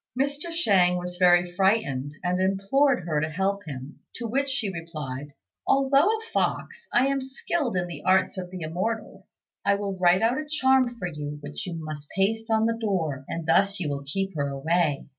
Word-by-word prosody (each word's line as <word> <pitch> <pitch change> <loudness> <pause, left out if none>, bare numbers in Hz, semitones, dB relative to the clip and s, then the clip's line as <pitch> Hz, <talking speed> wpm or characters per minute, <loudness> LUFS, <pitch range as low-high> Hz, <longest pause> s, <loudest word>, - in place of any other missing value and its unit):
Mr. 285 +5 -1
Shang 190 - +3
was 180 0 -5
very 175 -1 +4
frightened, 175 - +1
and 180 +1 0
implored 195 +6 +2
her 155 -3 0
to 155 - -1
help 195 +5 -1
him; 135 0 -8 0.2
to 235 - -4
which 275 +5 0
she 230 -8 -2
replied, 150 -5 -6 0.4
"Although 275 +3 +4
a 440 +1 +2
fox, 470 - -1
I 245 - +4
am 275 0 +1
skilled 265 - -2
in 175 - 0
the 175 -1 -8
arts 190 0 +3
of 185 -2 -5
the 180 -1 -7
Immortals; 190 +4 -4 0.2
I 200 - +3
will 200 -1 -3
write 180 +2 +4
out 240 +4 +2
a 305 - -5
charm 265 -4 +3
for 180 - -3
you 150 -3 -5
which 145 +8 -6
you 175 - -4
must 155 -2 -7
paste 220 +4 0
on 220 0 +3
the 230 0 0
door, 160 -11 -1
and 165 -1 -4
thus 195 +5 +3
you 160 -5 -2
will 140 -1 -3
keep 195 +7 -3
her 140 -2 -1
away." 150 +2 0
190 Hz, 195 wpm, -26 LUFS, 165-230 Hz, 0.4 s, very